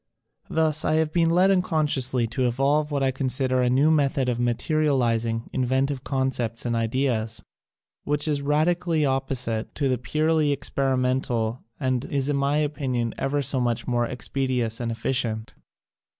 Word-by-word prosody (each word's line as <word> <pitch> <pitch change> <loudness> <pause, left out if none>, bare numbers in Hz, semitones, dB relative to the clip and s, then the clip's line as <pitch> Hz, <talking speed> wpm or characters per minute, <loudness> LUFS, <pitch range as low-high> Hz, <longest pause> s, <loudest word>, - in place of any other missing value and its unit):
Thus 155 -1 +2
I - - +1
have 155 -1 0
been 165 -2 +3
led 180 +3 +4
un 190 -2 +3
consciously 135 -7 +1
to 125 +2 0
evolve 140 +5 +1
what 140 -2 -1
I 135 - +2
consider 130 -1 0
a 125 - +2
new 140 +5 +3
method 140 -4 +1
of 120 -1 -2
materializing 120 -3 0
inventive 130 +1 0
concepts 130 -4 -2
and 120 -1 0
ideas, 115 -1 -1 0.6
which 145 +1 +2
is 145 -2 0
radically 160 +2 +1
opposite 130 -4 -1
to 140 - 0
the 130 -2 0
purely 155 +3 +1
experimental 130 -4 -1 0.2
and 130 -3 0
is 140 0 -1
in 145 - +1
my 140 +1 +1
opinion 135 -6 -1
ever 145 +1 0
so 130 0 +2
much 120 -1 -1
more 120 -1 +1
expeditious 125 -3 -2
and 120 -1 -2
efficient. 115 -1 -1
130 Hz, 150 wpm, -24 LUFS, 120-145 Hz, 0.6 s, led